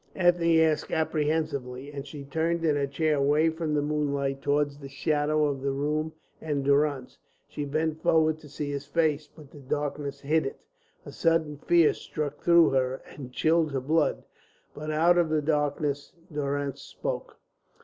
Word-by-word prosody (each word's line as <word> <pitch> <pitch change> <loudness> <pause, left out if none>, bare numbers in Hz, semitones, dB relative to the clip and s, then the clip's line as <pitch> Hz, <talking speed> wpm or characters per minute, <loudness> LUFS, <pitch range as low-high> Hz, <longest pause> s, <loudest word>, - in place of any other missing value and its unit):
Ethne 175 -2 +3
asked 155 -1 +1
apprehensively, 150 -4 -1
and 140 -1 -7
she 145 0 -8
turned 165 +4 -1
in 150 -2 +3
her 140 -1 0
chair 150 +2 +1
away 150 +3 +3
from 160 -2 -2
the 145 - +1
moonlight 140 -2 -1
towards 145 0 0
the 140 -1 -9
shadows 150 0 +1
of - - -12
the 140 - -1
room 150 +3 -1 0.3
and 145 -3 -2
Durrance. 140 -2 +1 0.3
She 145 0 -5
bent 155 +2 -1
forward 160 -1 +3
to 150 - -14
see 145 0 -4
his 140 0 -5
face, 155 -2 +1
but 150 -2 -16
the 145 - -12
darkness 140 0 -3
hid 155 +1 +1
it. - - -7 0.5
A - - -8
sudden 160 -3 +1
fear 170 -2 +5
struck 145 -1 -5
through 170 -1 +5
her 130 0 0
and 130 -3 -8
chilled 160 +2 +2
her 135 - 0
blood, 150 +4 +1 0.5
but 155 +1 -6
out 170 +3 +4
of 170 -2 +2
the 155 0 +2
darkness 145 -1 -1 0.2
Durrance 140 -1 -2
spoke. - - -5
150 Hz, 170 wpm, -27 LUFS, 140-160 Hz, 0.5 s, fear